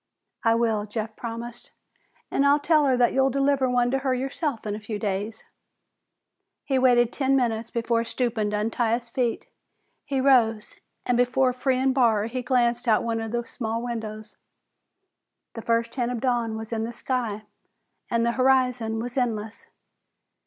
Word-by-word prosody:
"I 225 -1 +4
will," 225 -3 +1
Jeff 215 +1 -5
promised, 235 0 -7 0.6
"and 275 - +2
I'll 285 +1 +5
tell 305 -1 +3
her 260 -2 +3
that 245 -1 +3
you'll 270 0 +3
deliver 275 0 +1
one 245 -1 +2
to 270 - +1
her 265 -1 0
yourself 270 -1 -3
in 210 - -2
a 210 - -4
few 210 0 -5
days." 205 +2 -3 1.2
He 270 -2 +1
waited 245 -2 +4
ten 270 -1 +1
minutes 230 -3 0
before 230 0 0
stooping 230 -3 -1
to 210 - -1
untie 225 +2 +1
his 240 0 -7
feet. 245 -2 -1 0.6
He 280 -2 -2
rose, 235 -5 +3 0.3
and 245 -1 +1
before 255 +1 +2
freeing 260 +1 +1
Barr 230 -5 +3
he 250 +3 -3
glanced 245 -1 +1
out 220 -2 +4
of - - -5
one 225 -1 -1
of 225 -1 -5
the 240 0 -2
small 230 0 -3
windows. 220 -2 -5 1.2
The 225 - -6
first 230 0 0
hint 245 -2 -1
of 245 - -3
dawn 235 -3 0
was 225 +1 -6
in 220 -1 -1
the 230 - -3
sky 235 -4 -3 0.7
and 230 0 +1
the 235 - +2
horizon 250 -3 +2
was 245 +3 -3
endless. 220 -3 -3
235 Hz, 170 wpm, -25 LUFS, 225-255 Hz, 1.2 s, I'll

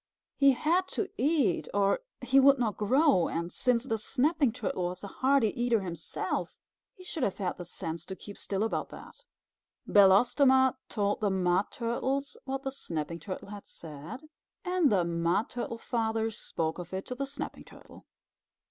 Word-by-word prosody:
He 275 -1 +5
had 340 +8 +1
to 405 - -1
eat, 280 - +1
or 200 -1 +3 0.2
he 255 +2 +4
would 275 +1 +6
not 230 -5 0
grow, 260 - +3
and 170 +1 -3
since 250 -2 +1
the 225 -4 -2
Snapping 280 +3 +1
Turtle 185 -5 -3
was 180 +2 -5
a - - -4
hearty 260 +2 +2
eater 240 -2 +1
himself, 170 -3 -4 0.4
he 370 - -14
should 335 -3 -5
have 200 -6 0
had 185 -3 -3
the 175 - -6
sense 165 -2 -5
to 190 - -5
keep 205 +1 -10
still 195 +1 -2
about 225 - -2
that. - - -12 0.6
Belostoma 255 +7 +5
told 205 -1 0
the 210 - +1
Mud 185 0 +1
Turtles 265 +4 -2
what 270 0 -3
the 270 - -2
Snapping 170 - -4
Turtle 185 +3 -7
had 205 -1 -9
said, 160 - -9 0.4
and 360 -6 +2
the 185 -4 +3
Mud 170 +5 0
Turtle 240 -1 -4
Father 225 -1 -1
spoke 165 -5 -3
of 180 +1 -6
it 190 - -4
to - - -5
the 275 +2 -3
Snapping 285 +2 -6
Turtle. - - -16
225 Hz, 170 wpm, -29 LUFS, 185-270 Hz, 0.6 s, would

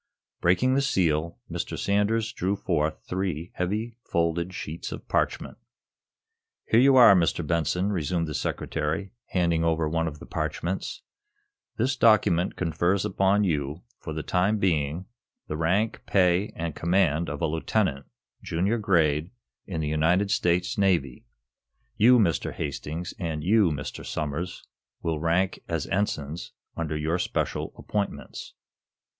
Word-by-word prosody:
Breaking 95 +9 +3
the 140 - +3
seal, 85 - +1
Mr. - - -4
Sanders 105 +3 +1
drew 95 -2 -1
forth 80 -5 -1
three 90 -3 -3
heavy, 105 +6 -2
folded 85 +1 0
sheets 85 -3 -6
of - - -8
parchment. - - -1 1.1
"Here 115 - +4
you 135 +1 +6
are, 125 -6 +9
Mr. 85 -2 +2
Benson," 85 +5 0
resumed 85 -2 -1
the 75 - -4
Secretary, 80 +5 -2 0.2
handing 85 -3 +1
over 80 -1 +1
one 80 +1 0
of 75 -2 -5
the - - -11
parchments. 80 +4 -3 0.7
"This 125 +3 +1
document 105 -7 +3
confers 85 +3 0
upon 100 +2 +2
you, 75 -3 -1 0.2
for 80 - -7
the 80 0 -4
time 95 +4 +1
being, 85 -3 0 0.4
the 75 - -3
rank, 95 +8 0
pay 90 +1 +3
and 80 -1 -3
command 85 -2 +1
of - - -4
a 85 - +1
lieutenant, 80 -2 0 0.3
junior 95 +8 0
grade, 80 -6 +2 0.4
in 85 -5 -3
the 75 - -1
United 85 +6 +2
States 90 +7 +1
Navy. 85 -10 +1 0.7
You, 125 +4 +6
Mr. 95 -8 +1
Hastings, 80 +4 -4
and 80 -4 -3
you, 105 0 +4
Mr. 75 -3 -5
Somers, 80 +4 -4 0.4
will 80 -2 -1
rank 85 +4 +1
as 80 -3 -2
ensigns 85 -5 -2 0.2
under 80 -2 -2
your 80 +4 0
special - - -2
appointments." 105 -1 -4
85 Hz, 135 wpm, -26 LUFS, 80-100 Hz, 1.1 s, are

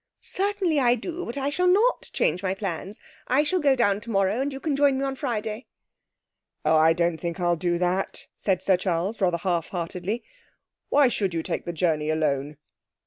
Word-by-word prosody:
'Certainly 385 -5 0
I 245 -2 +4
do, 345 +9 -5
but 235 - -5
I 275 0 0
shall 360 +5 +1
not 420 +7 +3
change 180 - 0
my 190 -1 -1
plans. 195 0 -5 0.3
I 275 +4 +3
shall 365 +4 +1
go 280 -4 +4
down 205 -5 +2
tomorrow, 210 0 0
and 280 +1 -1
you 270 - -6
can 290 0 -1
join 280 -1 +3
me 270 - -1
on 270 0 -2
Friday.' 225 -3 -3 1.0
'Oh, 155 +1 +4
I 160 +1 +6
don't 170 0 +1
think 170 +2 -4
I'll 175 -1 +2
do 175 +1 0
that,' 180 +2 -1
said 190 -2 -1
Sir 190 -2 +3
Charles, 185 +4 -2
rather 180 -2 +2
half 170 -2 -1
heartedly. 180 +5 -3 0.7
'Why 285 -2 +5
should 195 -7 -1
you 165 - -1
take - - -3
the 175 - -3
journey 155 -2 0
alone?' 150 -2 -1
195 Hz, 195 wpm, -25 LUFS, 175-270 Hz, 1.0 s, I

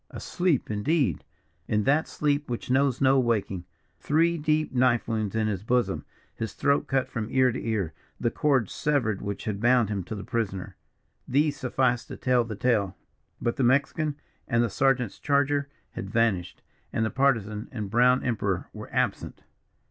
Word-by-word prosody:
Asleep, 175 -11 -1
indeed! 105 - 0 0.4
in 105 -1 +1
that 145 +6 +2
sleep 145 -1 -1
which 120 +1 -4
knows 135 -1 +2
no 135 0 +5
waking. 105 -7 0 0.3
Three 165 +3 +2
deep 155 -2 0
knife 125 -2 +2
wounds 110 -3 -2
in 110 -1 +1
his 100 -4 -1
bosom, 120 +3 0 0.3
his 110 -2 -5
throat 140 0 +1
cut 135 -1 +1
from 115 -3 -4
ear 130 -1 +3
to - - -5
ear, 105 -8 -1 0.3
the 120 - 0
cords 135 -8 +1
severed 125 -9 0
which 100 +1 -5
had 105 -3 -2
bound 120 -2 +4
him 100 -3 -2
to 110 - -5
the 100 - -6
prisoner 110 -6 -3 0.5
these 145 +3 +2
sufficed 125 -2 0
to - - -8
tell 125 -2 +2
the 115 -2 -6
tale. 105 -4 +1 0.4
But 120 - -1
the 135 - +1
Mexican 140 +4 +2 0.3
and 115 0 +2
the 115 - -1
sergeant's 125 -3 +1
charger 140 0 +1 0.2
had - - -6
vanished, 110 -7 0 0.3
and 110 - 0
the 110 - -2
Partisan 115 -6 +1
and 105 -6 -5
brown 125 +3 +4
Emperor 100 -6 -1
were - - -9
absent. - - -2
120 Hz, 170 wpm, -27 LUFS, 110-135 Hz, 0.5 s, no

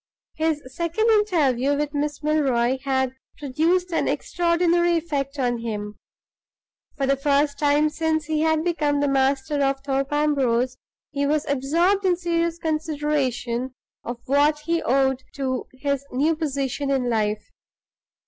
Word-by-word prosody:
His 315 -2 -1
second 345 +7 +1
interview 285 - +2
with 295 0 -2
Miss 295 0 -2
Milroy 265 -5 +1
had 265 -1 0 0.2
produced 330 +6 0
an - - +1
extraordinary 345 0 +1
effect 290 -4 -3
on 245 -3 0
him. 210 -3 -5 1.0
For 275 - 0
the 275 +1 +2
first 285 +1 +1
time 295 +1 +3
since 315 -1 -1
he 310 0 -1
had 315 0 +2
become 300 -4 0
the 285 - +1
master 275 +2 +1
of 275 0 0
Thorpe 275 0 -1
Ambrose, 260 -4 +1 0.4
he 280 -1 -1
was 300 0 +1
absorbed 335 +9 +1
in 370 -2 +3
serious 340 -1 -1
consideration 295 -6 -2 0.3
of 240 0 -5
what 295 +2 +2
he 335 +2 0
owed 265 0 +1
to 260 -2 -2
his 280 +1 -2
new 295 +6 +1
position 280 -2 -2
in 265 -3 +1
life. 215 -2 -1
285 Hz, 140 wpm, -23 LUFS, 265-315 Hz, 1.0 s, time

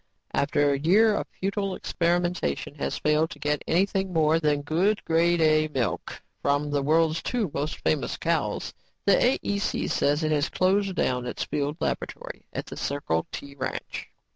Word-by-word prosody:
"After 145 0 +2
a 140 - -1
year 205 +9 +5
of - - -2
futile 195 0 -2
experimentation 175 - -1
has 70 0 -2
failed 150 +1 +2
to - - -9
get 150 +1 -1
anything 190 +2 +1
more 160 -1 +3
than 150 -2 +1
good, 180 +8 +1
Grade 170 +1 +3
A 155 -1 +4
milk 130 -9 -3 0.2
from 145 +1 +1
the 145 -1 +1
world's 160 +2 +2
two 225 - -1
most 150 +2 -2
famous 80 - 0
cows, - - -1 0.3
the 200 - +5
AEC 205 -5 +1
says 145 +3 +1
it 155 - +1
has 150 0 +1
closed 195 +1 +1
down 125 -5 0
its - - -3
field 150 +1 -2
laboratory - - -4
at - - -4
the - - -9
Circle 80 -13 -1
T 140 0 -7
ranch." 130 -2 -5
155 Hz, 165 wpm, -26 LUFS, 145-180 Hz, 0.3 s, year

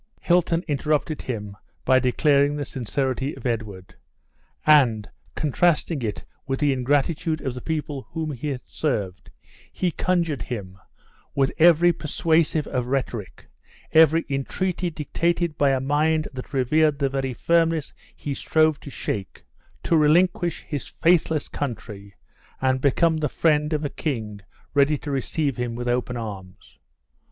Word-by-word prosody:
Hilton 175 -1 +2
interrupted 150 +1 0
him 105 -5 -5 0.3
by 130 0 +5
declaring 140 +3 +3
the 145 -1 -3
sincerity 130 +3 -2
of - - -12
Edward; 105 -6 -4 0.7
and, 125 -9 +5 0.3
contrasting 155 0 +1
it 110 -3 -4 0.2
with 135 -1 -1
the 145 -2 +2
ingratitude 145 +5 0
of 130 -3 -3
the 125 - -7
people 150 -4 -4
whom 160 -2 -3
he 135 +2 -5
had 130 -3 -4
served, 100 - -3 0.4
he 180 -2 -1
conjured 170 -7 0
him, 95 -7 -6 0.6
with 135 -1 +2
every 175 +1 +6
persuasive 160 -1 +1
of 125 -1 -2
rhetoric, 125 -6 -3 0.5
every 160 +1 +5
entreaty 175 +6 -2
dictated 170 +1 -1
by 140 -1 +3
a 135 -1 +2
mind 155 +3 +1
that 130 +2 -8
revered 145 +3 +2
the 140 -1 +1
very 135 -2 -2
firmness 165 -1 +1 0.2
he 145 - -4
strove 155 +1 +2
to - - -10
shake, 100 -7 -5 0.4
to 170 - +2
relinquish 170 +2 +3
his 145 -4 -5
faithless 165 -3 +2
country, 105 -7 -6 0.4
and 130 0 +1
become 160 +4 +3
the 150 -1 -1
friend 150 -1 +1
of 155 -1 -1
a - - -1
king 110 -9 -4 0.3
ready 145 +1 +3
to 145 - -6
receive 140 +1 -1
him 120 -1 -3
with 120 +1 -4
open 125 0 -1
arms. 100 -5 -9
145 Hz, 140 wpm, -24 LUFS, 125-160 Hz, 0.7 s, every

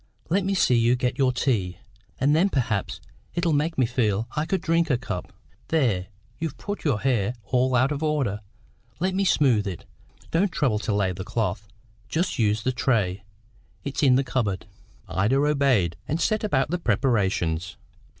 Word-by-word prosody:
Let 190 +4 +2
me 195 0 0
see 165 -8 +3
you 120 +1 +4
get 125 +2 -2
your 130 -2 +4
tea, 105 -9 0 0.4
and 145 +3 +3
then 180 +5 +3
perhaps 115 - -1 0.4
it'll 170 -2 +1
make 155 +3 0
me 130 - +4
feel 115 -3 0
I 150 +1 -1
could 190 +2 0
drink 165 0 +1
a 130 - +3
cup. 115 -7 -5 0.4
There, 115 - +1 0.3
you've 160 -3 -4
put 205 0 -5
your 130 -9 +1
hair 120 -3 +1
all 125 +3 +1
out 130 +3 +3
of 145 0 -2
order; 145 -10 0 0.6
let 185 +2 0
me 195 +1 +1
smooth 125 - +3
it. 95 -3 -6 0.5
Don't 180 +4 +2
trouble 130 -10 +1
to 110 - -2
lay 100 -2 +1
the 95 +1 -6
cloth; 105 -1 -2 0.4
just 170 -3 -1
use 105 -1 +2
the 130 - +1
tray; 105 -7 0 0.6
it's 140 -1 -3
in 135 -4 +5
the 135 - +3
cupboard." 115 -7 -1 0.4
Ida 105 +8 +1
obeyed, 135 - +2
and 155 - -1
set 215 +5 +1
about 145 -8 +1
the 180 - 0
preparations. 95 - 0
130 Hz, 175 wpm, -25 LUFS, 105-150 Hz, 0.6 s, in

